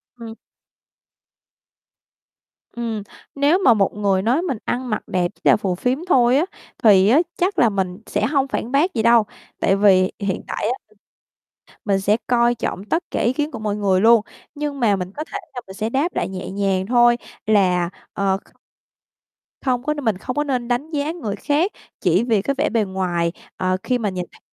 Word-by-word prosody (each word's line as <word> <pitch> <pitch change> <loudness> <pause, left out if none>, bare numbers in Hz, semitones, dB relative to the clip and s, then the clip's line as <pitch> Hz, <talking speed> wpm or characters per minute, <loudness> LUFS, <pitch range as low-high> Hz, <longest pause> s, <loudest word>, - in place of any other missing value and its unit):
Ừm. 230 -2 -9 2.4
Ừm, 230 -3 -3 0.3
nếu 285 +5 +3
mà 265 -11 +5
một 200 -3 +1
người 200 -2 +1
nói 245 - +1
mình 330 -9 -2
ăn 250 +1 -2
mặc 215 - -2
đẹp 175 -1 0
chỉ - - -31
là - - +6
phù 190 -3 -2
phiếm 250 +8 -1
thôi 250 -5 +4
á, 310 - +2 0.4
thì 200 -3 +6
á 265 +7 +6 0.2
chắc 365 +2 0
là 235 - +5
mình 190 -2 -2
sẽ - - -1
hông 275 +2 +1
phản 245 -3 -3
bác 310 +7 +2
gì 220 - -1
đâu, 235 -1 +6 0.4
tại 195 - +3
vì 190 -2 +4
hiện 200 -2 -2
tại - - -3
á 255 - -5 0.9
mình 195 -2 +1
sẽ 205 +2 +2
coi 240 -1 +3
trọng 200 -4 -4
tất 325 +10 -1
cả - - -2
ý 240 - +2
kiến 295 +3 -2
của - - -7
mọi 210 -1 -2
người 195 -3 +2
luôn. 230 +2 +6 0.3
Nhưng 290 -2 -4
mà 210 -4 +3
mình 185 0 -5
có 305 - -5
thể 405 - -2 0.2
là 245 - -4
mình 190 - -10
sẽ 220 +1 -2
đáp 285 +8 0
lại - - -1
nhẹ 190 -1 -6
nhàng 195 -1 0
thôi 240 +1 +4 0.3
là, 180 -5 +2 0.2
ờ, 195 -1 0
kh - - -27 1.0
không 250 -2 0
có 300 - 0
mình 240 -10 -1
không 250 +6 -5
có 295 - +1
nên 255 -4 -2
đánh 250 +6 -2
giá 295 0 -1
người 295 -13 -4
khác 310 +7 0 0.3
chỉ 180 +4 +3
vì 225 -4 +2
cái 275 - -1
vẻ - - +1
bề 230 -2 +1
ngoài, 180 -3 -1 0.3
ờ, 185 0 0
khi 250 - +1
mà 220 -4 -1
nhìn 180 -2 -4
thấy - - -19
225 Hz, 200 wpm, -21 LUFS, 195-265 Hz, 2.4 s, là